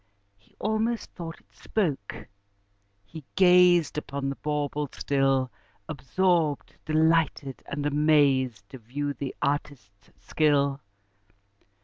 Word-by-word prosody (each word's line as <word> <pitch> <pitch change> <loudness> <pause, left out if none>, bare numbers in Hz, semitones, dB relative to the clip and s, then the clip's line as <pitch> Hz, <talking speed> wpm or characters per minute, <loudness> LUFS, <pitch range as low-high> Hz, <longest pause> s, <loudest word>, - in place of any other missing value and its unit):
He 100 - -31
almost 220 +2 -1
thought 165 -2 -8
it - - -32
spoke: 150 - -3 0.8
he 155 +9 -10
gazed 180 -4 +5
Upon 140 -1 -4
the 140 - -3
bauble 150 -1 -2
still, 135 -2 0 0.4
Absorbed, 155 +2 0
delighted, 155 -3 +1
and 145 +1 -4
amazed, 140 -7 +2
To 130 - -10
view 145 +5 -4
the 140 -1 -6
artist's 140 -8 -4
skill. 140 -2 +1
145 Hz, 100 wpm, -26 LUFS, 135-160 Hz, 0.8 s, gazed